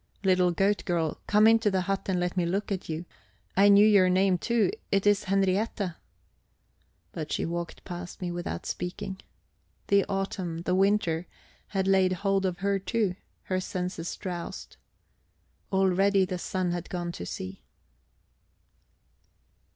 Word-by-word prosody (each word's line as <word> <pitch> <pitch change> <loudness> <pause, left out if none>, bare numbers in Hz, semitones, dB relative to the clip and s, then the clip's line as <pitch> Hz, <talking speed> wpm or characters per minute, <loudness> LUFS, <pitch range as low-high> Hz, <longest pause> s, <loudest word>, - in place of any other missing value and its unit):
"Little 185 -2 +4
goat 195 +4 +1
girl, 165 -4 -1
come 210 +1 +5
into 225 -1 +5
the 190 -2 +1
hut 195 +2 -2
and 185 -2 +1
let 180 +1 -1
me 180 - +1
look 195 +5 -1
at 190 -3 -3
you. 160 +2 -3 0.5
I 200 +2 +6
knew 200 +1 +7
your 200 -4 +5
name, 185 0 +3
too 235 - +2 0.2
it 195 0 +2
is 205 -1 +3
Henriette." 195 0 0 1.2
But 155 -2 -6
she - - 0
walked 170 0 -5
past 175 -1 -7
me 180 -2 -3
without 175 - -4
speaking. 190 +2 -5 0.7
The 200 -1 +5
autumn, 185 -4 -3
the 180 - 0
winter, 185 -3 +2 0.4
had 195 -2 -1
laid 190 -1 +4
hold 195 0 +1
of 180 0 -4
her 200 -1 +2
too; 195 0 0 0.3
her 185 -1 -1
senses 180 -2 -4
drowsed. 175 -3 -6 1.0
Already 195 0 +3
the 180 0 -4
sun 185 0 -1
had 175 -1 -4
gone 175 -1 -3
to 85 - -7
sea. 95 +1 -6
185 Hz, 145 wpm, -28 LUFS, 175-195 Hz, 1.2 s, knew